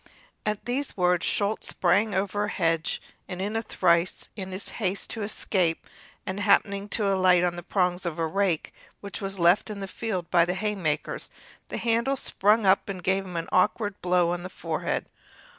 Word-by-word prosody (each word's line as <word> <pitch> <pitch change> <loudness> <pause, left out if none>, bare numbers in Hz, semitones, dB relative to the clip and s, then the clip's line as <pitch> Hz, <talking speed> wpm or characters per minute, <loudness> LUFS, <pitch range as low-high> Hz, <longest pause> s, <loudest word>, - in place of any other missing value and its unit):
At 210 -1 -2
these 260 +1 -2
words 180 -1 +2
Schulz 205 +1 0
sprang 200 +3 +2
over 200 +2 0
a - - -4
hedge, 165 -4 0 0.3
in 180 -1 -6 0.2
a 225 - +1
trice, 170 -5 +1
in 190 -3 -5
his 185 +2 -4
haste 195 -1 -1
to 225 - -3
escape, 190 -5 0 0.4
and, 190 +2 -3
happening 200 0 +2
to 210 -2 +1
alight 185 -2 +4
on 175 -1 +1
the 175 - -6
prongs 180 0 0
of 170 -2 -3
a 165 - 0
rake 185 -1 0 0.3
which 200 +2 -7
was 195 0 -4
left 175 +5 +4
in 210 -1 -5
the 195 - -4
field 190 -4 -4
by 175 -2 +6
the 180 +2 -1
haymakers, 190 -7 -2 0.4
the - - -4
handle 235 +4 +1
sprang 210 -2 +2
up 190 +1 +4
and 185 -3 -5
gave 190 +1 +1
him 180 -2 -6
an 165 - -3
awkward 205 +2 +1
blow 180 -1 +2
on 175 0 -2
the 180 - -6
forehead. 165 -3 -2
190 Hz, 185 wpm, -26 LUFS, 175-205 Hz, 0.4 s, by